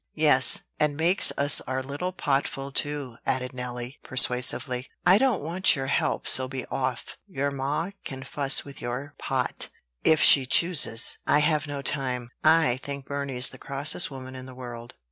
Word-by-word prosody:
"Yes; 140 -5 +4 0.2
and 150 -1 +1
makes 175 +5 +4
us 145 +1 +4
our 130 +1 -2
little 145 +7 -4
potful 140 -4 -2
too," 145 -5 -2
added 125 0 -2
Nelly, 125 0 -6
persuasively. 125 0 +1 0.2
"I 185 +3 +6
don't 250 - +1
want 170 +4 +2
your 135 -2 -3
help; 135 - -1
so 130 0 +3
be 130 0 -5
off. 130 -2 -3
Your 140 -6 -2
ma 145 +6 -2
can 130 -1 -7
fuss 140 +1 0
with 140 -1 -11
your 130 +4 -5
pot, - - -1 0.3
if 160 - +4
she 135 -3 +6
chooses. 145 -7 +2
I've 150 +1 +2
no 140 -1 -5
time." 125 -3 -2
"I 155 -6 +4
think 140 -1 -6
Burney's 140 -2 +1
the - - -13
crossest 145 +5 -1
woman 130 -1 -9
in 130 0 -9
the 130 - -11
world. 120 -2 -9
135 Hz, 165 wpm, -26 LUFS, 130-150 Hz, 0.3 s, I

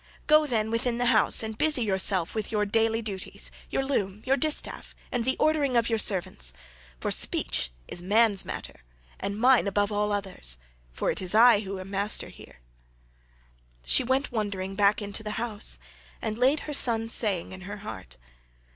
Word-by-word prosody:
Go, 305 0 +5
then, 220 -4 0
within 235 +1 0
the 245 - 0
house 215 +1 +5
and 220 0 -4
busy 300 0 +2
yourself 190 -3 +2
with 220 -2 -3
your 210 -1 +1
daily 225 +2 +1
duties, 195 -3 -4 0.2
your 270 - -1
loom, 210 -7 -2
your 265 +1 +3
distaff, 305 +1 -1 0.2
and 245 -2 -1
the 260 +2 0
ordering 290 -5 +2
of 235 0 +2
your 225 -1 +1
servants; 175 - -1 0.5
for - - -2
speech - - 0 0.2
is 175 - -7
man's 205 +1 +3
matter, - - -7 0.4
and 200 +1 -3
mine 250 -2 +4
above 205 +1 0
all 210 0 0
others 190 - -2 0.4
10—for - - -1
it - - -4
is 185 +2 -2
I 230 -1 +7
who 195 -2 -5
am 185 +1 -9
master 200 +1 0
here." - - -15 1.2
She - - +4
went 265 +3 0
wondering 200 -4 -3
back 205 +1 +2
into 205 +2 -5
the 210 0 -5
house, 220 - 0 0.4
and 215 - -3
laid 265 +6 +2
her 300 - -6
son's 230 -4 +1
saying 195 -7 -1
in 190 0 -9
her 205 - -6
heart. 70 - -8
215 Hz, 175 wpm, -27 LUFS, 195-240 Hz, 1.2 s, I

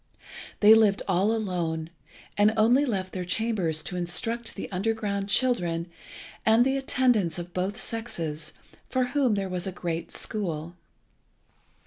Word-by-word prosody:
They 210 +1 +9
lived 215 -3 +4
all 190 +3 +2
alone, 170 -7 -2 0.4
and 210 +1 +4
only 245 +6 +4
left 190 -7 -3
their 185 - -3
chambers 180 -5 -1
to 180 - -5
instruct 225 +7 -1
the - - -5
underground 200 0 -2
children 175 -8 +1 0.5
and 225 +2 +5
the 270 +1 +1
attendants 245 -10 +1
of 175 0 -7
both 190 +3 -2
sexes, 165 -11 -3 0.4
for 260 - +1
whom 260 -5 +2
there 195 -1 -2
was 180 0 -4
a - - -2
great 170 -2 -4
school. 170 -6 -2
200 Hz, 135 wpm, -27 LUFS, 175-225 Hz, 0.5 s, They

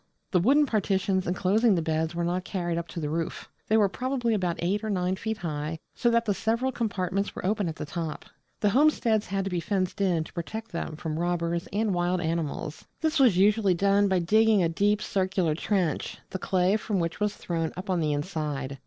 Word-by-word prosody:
The 185 - +4
wooden 280 - +4
partitions 195 -5 0
enclosing 195 +5 +3
the 170 - +1
beds 160 0 -1
were 170 - -1
not 180 +2 -1
carried 175 -3 -2
up 170 - -6
to 170 - -6
the 150 -2 -3
roof; 165 0 -3 0.2
they 220 - +4
were 210 -2 +5
probably 245 +2 -1
about 180 -5 0
eight 195 +5 -1
or 220 - -2
nine 185 -2 0
feet 220 +3 -3
high, 155 -3 -3 0.2
so 240 - +1
that 235 0 +2
the 205 - +2
several 230 +6 0
compartments 200 -4 -2
were - - -5
open 200 -2 +1
at 160 - -5
top. 160 0 -5 0.4
The 205 - +3
homesteads 240 -5 +3
had 195 +1 -1
to 195 - -3
be 175 - 0
fenced 185 +3 -1
in 175 -5 +2
to - - -13
protect 220 +6 -5
them 170 -2 -4
from 155 0 -4
robbers 170 -1 -1
and 210 0 0
wild 175 +1 +1
animals. 160 -2 -3 0.2
This 315 -1 +1
was 245 -9 +5
usually 200 -1 +4
done 200 +2 +3
by 190 -1 +2
digging 215 +3 +4
a 165 - +2
deep 205 +5 +1
circular 185 -5 0
trench, 175 0 -1
the 190 - -3
clay 185 +2 +2
from 210 -2 -2
which 170 0 -2
was 210 -1 0
thrown 165 -2 -2
up 185 +3 -6
on 180 - +1
the 155 -2 +1
inside. 145 -3 -3
185 Hz, 210 wpm, -27 LUFS, 170-210 Hz, 0.4 s, were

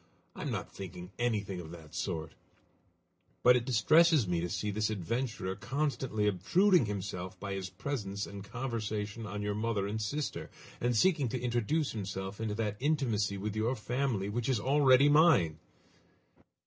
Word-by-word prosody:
I - - -7
am - - -3
not - - -4
thinking 90 -1 -8
anything 105 -6 -1
of 80 -3 -8
that 80 -2 -11
sort; 80 -2 -3 1.1
but 125 0 +7
it 120 -1 0
distresses 150 - +5
me 85 -2 0
to 90 - -2
see 105 +4 -2
this 105 +1 0
adventurer 110 -1 -2
constantly 130 -5 -1
obtruding 140 - +3
himself 95 -2 -5
by 100 -1 -4
his 95 -1 -4
presence 100 -8 -4
and 100 -1 -8
conversation 110 -2 -4
on 105 +1 -4
your 105 0 -1
mother 105 -1 -1
and 105 +2 -3
sister, 140 +8 -3 0.3
and 120 -1 +1
seeking 155 -5 +3
to 125 - -2
introduce 125 +5 0
himself 100 -1 -5
into 110 -2 -2
that 105 -2 -2
intimacy 120 -9 +1
with 105 +2 -4
your 115 +4 +1
family 120 -3 -1
which 115 +4 -2
is 130 -5 +2
already 135 +2 +5
mine." 145 - +5
110 Hz, 160 wpm, -32 LUFS, 100-130 Hz, 1.1 s, but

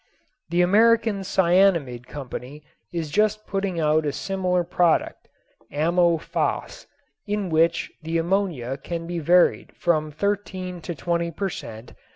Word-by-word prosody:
The 175 +1 +3
American 220 +2 +4
Cyanamid 170 -10 +2
Company 140 +1 -8 0.3
is 165 -4 -4
just 215 +4 +1
putting 195 -3 -2
out 155 0 +2
a 145 - -1
similar 180 +2 -1
product, 170 -1 +1 0.4
"Ammo 170 +3 +2
Phos," - - -3 0.4
in 205 -2 -1
which 165 +1 +2
the 165 +1 -2
ammonia 165 -8 -1
can 165 +4 -5
be 175 0 -3
varied 175 +3 +3
from 155 -3 +1
thirteen 185 +1 -3
to 170 +1 -5
twenty 170 0 -1
per 195 +4 -3
cent. 115 -8 -9
170 Hz, 130 wpm, -24 LUFS, 155-195 Hz, 0.4 s, American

